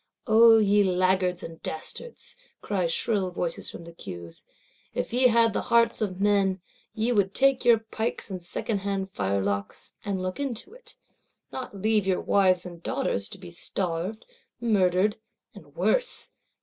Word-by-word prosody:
O 225 0 +7
ye 205 -1 +4
laggards 185 -1 +1
and 165 0 -9
dastards, 455 - -5 0.2
cry 190 -4 -1
shrill 190 +3 0
voices 175 -1 -3
from - - -9
the 170 - -10
Queues, 85 - -9 0.5
if - - -3
ye 255 +1 +5
had 230 -2 +4
the - - 0
hearts 235 0 +2
of 190 -4 -2
men, 200 -2 +2 0.4
ye 225 +3 0
would 200 -4 +1
take 270 -1 +3
your 235 -1 +6
pikes 220 -1 -4
and 185 -1 -5
secondhand 195 +1 -3
firelocks, 100 - -2
and 200 -2 -2
look 185 +4 -4
into 280 - -4
it; - - -13 0.5
not 250 -6 -7
leave 215 -1 +2
your 185 -1 +2
wives 185 -2 +3
and 175 -2 -9
daughters 215 - -2
to - - -9
be 180 -2 -11
starved, 180 +4 -3 0.3
murdered, 205 -3 +2 0.4
and - - -15
worse! - - 0
195 Hz, 150 wpm, -26 LUFS, 180-225 Hz, 0.5 s, O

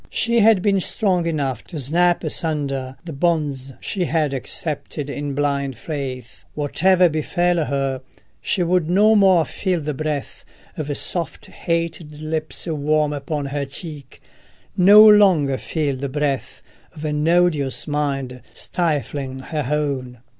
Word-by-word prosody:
She 235 0 +1
had 215 -3 +5
been 200 -2 +3
strong 185 -3 +1
enough 140 -7 -2
to 160 - -7
snap 170 +6 +2
asunder 145 -5 -3
the 165 - -6
bonds 145 -4 -1
she 185 -3 -2
had 155 -4 0
accepted 145 +2 -4
in 145 -1 -4
blind 140 -3 -1
faith: 130 -4 -6
whatever 180 +5 +3
befell 170 +1 0
her, 135 -2 -2 0.4
she 185 - 0
would 175 -1 +1
no 210 +5 +5
more 190 -5 +5
feel 185 -3 -2
the 150 -1 -3
breath 150 0 -4 0.3
of 145 -2 -3
soft 170 -3 -3
hated 165 -2 -3
lips 155 0 -3
warm 150 -2 0
upon 145 0 -3
her 140 +1 -3
cheek, 140 -1 -9 0.5
no 205 +4 +8
longer 185 -11 +5
feel 150 -4 -2
the 135 +1 -4
breath 140 -3 -2 0.3
of 155 0 -7
an 150 0 -1
odious 165 -6 +2
mind 135 -4 -2
stifling 145 -5 -2
her 150 0 -4
own. 140 -5 -2
150 Hz, 135 wpm, -21 LUFS, 140-175 Hz, 0.5 s, no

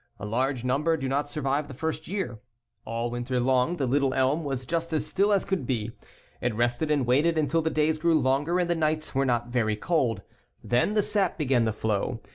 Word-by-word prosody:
A 100 - -6
large 125 +3 -1
number 150 +6 +1
do 135 -3 -3
not 145 +2 -1
survive 145 0 -1
the 135 - -9
first 160 +2 -3
year. 180 - -3 0.5
All 115 +1 -3
winter 120 +1 -2
long 130 +6 +2
the 140 - 0
little 135 +1 +1
elm 135 +5 +2
was 135 -3 -3
just 165 +4 -2
as 155 - 0
still 200 +2 +1
as 200 -2 +2
could 190 -10 -2
be. 115 -4 -1 0.5
It 120 -3 -1
rested 120 +6 0
and 145 -4 +2
waited 150 +7 +3
until 155 +2 +2
the 160 - 0
days 155 0 +1
grew 165 -1 +3
longer 145 +6 +1
and 175 - +1
the 175 - +2
nights 155 -1 -1
were 135 0 +1
not 120 -2 0
very 115 -3 +1
cold. 115 - 0 0.4
Then 125 - +1
the 210 - +3
sap 200 -4 0
began 130 -7 +2
to 110 - +1
flow. 110 +2 -2
135 Hz, 215 wpm, -27 LUFS, 120-160 Hz, 0.5 s, waited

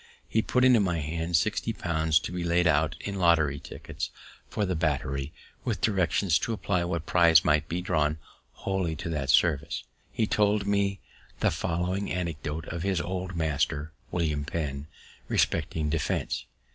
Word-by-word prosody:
He 110 - +2
put 125 +3 +2
into 125 -3 +6
my 90 -4 +1
hands 80 +2 0
sixty 110 +4 -1
pounds 80 -4 +1
to - - -5
be 90 -1 -3
laid 85 +1 +2
out 75 -2 +3
in 100 -1 -4
lottery 80 -5 +3
tickets - - -6 0.4
for 105 - -1
the 95 - -1
battery, 70 -3 -1 0.3
with - - -1
directions 95 -4 +2
to 115 - -2
apply 95 -4 0
what 85 -2 -2
prizes 85 -3 +5
might 75 0 +2
be 85 +2 -1
drawn 75 -3 +1 0.5
wholly 95 -4 0
to 80 - -5
that 70 -4 -2
service. 75 +1 +2 0.3
He 110 - +1
told 105 -1 +2
me 100 -1 +1 0.4
the - - +3
following 90 +4 -1
anecdote 80 -3 -3
of 85 0 -4
his 95 -1 0
old 95 +1 -3
master, 80 -1 0 0.2
William 75 -4 -1
Penn, 75 -2 -4 0.4
respecting 75 -2 0
defense. 80 -2 -1
85 Hz, 160 wpm, -28 LUFS, 75-95 Hz, 0.5 s, into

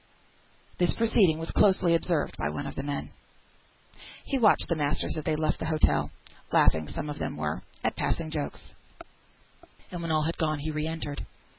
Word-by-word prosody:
This 175 -1 +2
proceeding 215 -8 +4
was 165 0 -4
closely 185 -4 +4
observed 165 -1 0
by - - -2
one 145 - -4
of 140 - -5
the - - -4
men. 145 0 -4 1.1
He 275 - -1
watched 215 -4 +5
the 170 - +1
masters 145 -1 0
as 155 - -3
they 155 - +1
left 155 0 0
the 160 - -2
hotel 155 -1 +2 0.4
(laughing, 80 -1 +4
some 145 - -4
of 145 0 -5
them - - -3
were, 75 0 -2 0.2
at - - 0
passing 160 -2 -1
jokes), 150 -2 -4 1.2
and 175 - -5
when 165 - -3
all 155 -1 +2
had 165 +2 -2
gone, 155 -2 +1
he 155 +2 -3
re 155 0 -2
entered. 160 -3 -4
155 Hz, 180 wpm, -28 LUFS, 145-170 Hz, 1.2 s, watched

